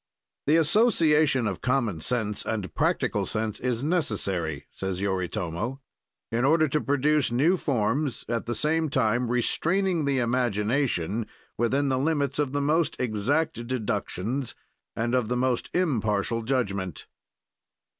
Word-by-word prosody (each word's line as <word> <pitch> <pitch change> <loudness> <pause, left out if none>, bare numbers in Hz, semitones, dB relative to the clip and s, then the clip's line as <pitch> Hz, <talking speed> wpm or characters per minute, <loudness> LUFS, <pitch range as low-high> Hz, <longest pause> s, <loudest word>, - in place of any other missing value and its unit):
"The 150 - +5
association 155 - +4
of 95 -5 -3
common 120 - 0
sense 110 -4 -1
and 105 -6 -3
practical - - 0
sense 110 -1 -2
is 125 -1 -1
necessary," 100 - -1
says 95 -1 -4
Yoritomo, 95 +4 -2 0.5
"in 115 +2 0
order 155 +3 +4
to 150 +2 0
produce 145 0 +2
new 145 +10 +3
forms, 135 - -1
at 115 0 -2
the 120 - -1
same 160 +5 +1
time 120 -2 +1
restraining 170 +8 +1
the 140 -1 +1
imagination 115 - 0 0.3
within 135 +5 +1
the 130 -1 +1
limits 145 -1 0
of 145 -3 +1
the 145 0 -1
most 160 +3 +1
exact 125 +4 0
deductions 115 +1 -2 0.4
and 120 +2 -1
of 125 -3 +2
the 125 - 0
most 125 -1 0
impartial 115 - 0
judgment." 100 - -2
125 Hz, 130 wpm, -26 LUFS, 110-145 Hz, 0.5 s, The